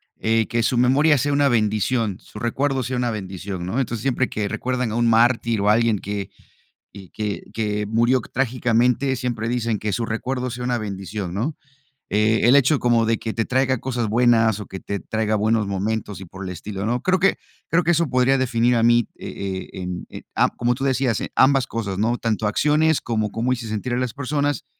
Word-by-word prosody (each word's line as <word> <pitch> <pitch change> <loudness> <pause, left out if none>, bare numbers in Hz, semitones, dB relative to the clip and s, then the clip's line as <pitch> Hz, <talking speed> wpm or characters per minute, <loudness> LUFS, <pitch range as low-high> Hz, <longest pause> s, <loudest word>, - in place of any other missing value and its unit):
eh: 110 0 +1
"Que 120 -1 0
su 120 - +1
memoria 140 +5 +4
sea 145 +3 0
una 140 -1 +3
bendición, 110 -1 0
su 105 - -11
recuerdo 130 +4 0
sea 130 +1 -3
una 125 -1 0
bendición", 95 -2 -5
¿no? 115 +9 -1
Entonces, 120 -3 -3
siempre 130 -1 0
que 105 -1 -2
recuerdan 125 +1 -2
a - - -3
un 120 0 +2
mártir 115 0 +3
o 100 +1 +2
a - - +6
alguien 115 -3 +2
que, 100 -1 -4 0.6
y 95 -2 -12
que 105 -2 -4
que 105 -2 -1
murió 120 +4 +2
trágicamente 125 +2 +1
siempre 120 -3 -3
dicen: 115 -2 -1
"Que 105 0 -3
su 115 +3 -1
recuerdo 125 +3 -3
sea 125 +1 -5
una 125 -1 0
bendición", 100 -3 -5
¿no?, 125 +10 -2 0.6
eh, 110 +2 +2
el 125 +4 +6
hecho 140 +2 +4
como 120 -3 +2
de 115 0 +2
que 110 - -4
te 115 - -1
traiga 130 0 +1
cosas 120 -3 -2
buenas 115 -1 +3
o 105 - -7
que 95 - -7
te 100 0 -4
traiga 110 -1 -2
buenos 110 +1 +2
momentos 100 +1 -3
y - - -7
por 95 +3 -10
el 90 - -4
estilo, 95 +3 -5
¿no?, 120 +2 0
creo 185 0 +2
que 195 +2 +3 0.3
creo 170 +2 +3
que 170 - +2
eso 170 -1 +2
podría 130 +1 +3
definir 125 -1 +2
a 115 - +2
mí, 120 0 +4
eh 95 -1 -5
eh, - - -7
en 90 -1 -5
eh, - - -8
ah, - - +3
como 120 0 +1
tú 135 - -5
decías: 130 -4 +1
"En - - -4
ambas 135 -1 +4
cosas", 105 -6 -4
¿no?, 115 +4 +1
tanto 110 -1 -1
acciones 150 +7 +2
cómo 110 -3 -1
cómo 120 +3 -1
hice 120 -2 -5
sentir 110 +3 -3
a - - 0
las 125 -2 -2
personas, 145 0 -1
115 Hz, 215 wpm, -22 LUFS, 105-125 Hz, 0.6 s, a